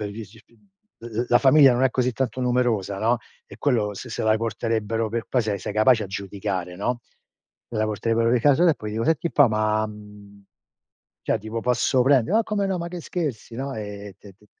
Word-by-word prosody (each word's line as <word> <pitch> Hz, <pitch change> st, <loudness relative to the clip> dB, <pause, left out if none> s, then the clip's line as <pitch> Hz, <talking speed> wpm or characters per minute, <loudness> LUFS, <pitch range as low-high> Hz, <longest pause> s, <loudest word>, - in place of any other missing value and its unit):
l 105 Hz, -1 st, -4 dB, 1.0 s
l 120 Hz, +1 st, -3 dB
la 120 Hz, -, +5 dB
famiglia 135 Hz, 0 st, +6 dB
non 120 Hz, +2 st, 0 dB
è 130 Hz, -, +3 dB
così 125 Hz, 0 st, 0 dB
tanto 130 Hz, +2 st, -2 dB
numerosa, 120 Hz, -6 st, 0 dB
no, 115 Hz, +3 st, +1 dB, 0.3 s
e -, -, -13 dB
quello 110 Hz, -7 st, 0 dB
se 125 Hz, -, -8 dB
se -, -, -3 dB
la 110 Hz, 0 st, +3 dB
porterebbero 115 Hz, 0 st, -2 dB
per 115 Hz, +1 st, -3 dB
qua 125 Hz, -, +2 dB
se 105 Hz, -3 st, -2 dB
sei 95 Hz, -, -5 dB
capace 110 Hz, +2 st, +4 dB
a -, -, -6 dB
giudicare, 95 Hz, -2 st, -4 dB
no, 120 Hz, +5 st, -2 dB, 0.7 s
se 120 Hz, -, -6 dB
la 110 Hz, -, +1 dB
porterebbero 115 Hz, +2 st, 0 dB
di 125 Hz, -, +4 dB
casa 145 Hz, +7 st, +4 dB
e 160 Hz, -, +4 dB
poi 105 Hz, -5 st, -7 dB
io: 115 Hz, +1 st, -2 dB
"Senti 160 Hz, +2 st, +1 dB
un -, -, -4 dB
po' 145 Hz, -4 st, +5 dB
ma 110 Hz, 0 st, +1 dB
mhmm 105 Hz, -1 st, -13 dB, 0.8 s
cioè -, -, 0 dB
tipo 110 Hz, +2 st, -5 dB
posso 125 Hz, +1 st, +2 dB
prendere", 135 Hz, -, +3 dB
"ma 225 Hz, -, +4 dB
come 210 Hz, -2 st, -1 dB
no, 190 Hz, -2 st, -1 dB
ma 170 Hz, 0 st, -4 dB
che 175 Hz, 0 st, -7 dB
scherzi?" 145 Hz, -10 st, -4 dB
no, 135 Hz, +3 st, -4 dB
e 105 Hz, -2 st, -7 dB
de 100 Hz, -2 st, -15 dB
de 105 Hz, -, -24 dB
115 Hz, 210 wpm, -24 LUFS, 105-130 Hz, 1.0 s, famiglia